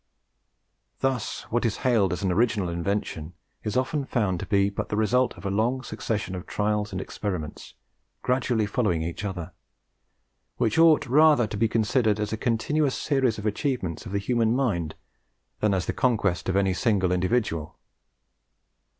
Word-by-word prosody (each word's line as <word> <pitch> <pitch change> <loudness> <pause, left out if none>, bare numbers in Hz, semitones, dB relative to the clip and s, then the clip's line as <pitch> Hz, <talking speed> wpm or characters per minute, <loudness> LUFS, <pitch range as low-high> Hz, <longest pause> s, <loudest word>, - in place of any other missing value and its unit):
Thus, 135 -3 -1
what 120 +1 +1
is 115 -4 0
hailed 110 -7 +3
as 90 - -3
an 95 - +1
original 105 -2 +1
invention 85 -2 -3 0.3
is 105 +2 -1
often 130 +3 0
found 105 -9 0
to - - -5
be 100 -1 +2
but 100 - -4
the - - -1
result 120 +4 +2
of - - -11
a 100 - -1
long 120 +6 0
succession 105 -6 -3
of 90 -2 -6
trials 105 0 -1
and 95 - -3
experiments 90 -7 -5 0.5
gradually 125 -3 +1
following 100 -7 0
each 85 +5 -5
other, 90 -4 -5 1.0
which 120 +4 +1
ought 165 -2 +6
rather 145 -1 +5
to 105 - -5
be 115 +2 +2
considered 110 -1 +1
as 105 0 -2
a - - -1
continuous 130 +5 0
series 135 -6 +1
of 105 - -6
achievements 110 - -2
of - - -8
the 100 - 0
human 115 +2 +1
mind 95 - -1 0.6
than 105 - +2
as 95 -2 0
the - - -2
conquest 105 - +1
of 95 - 0
any 95 -1 +2
single 95 -4 +1
individual. 90 -4 0
105 Hz, 165 wpm, -26 LUFS, 95-125 Hz, 1.0 s, ought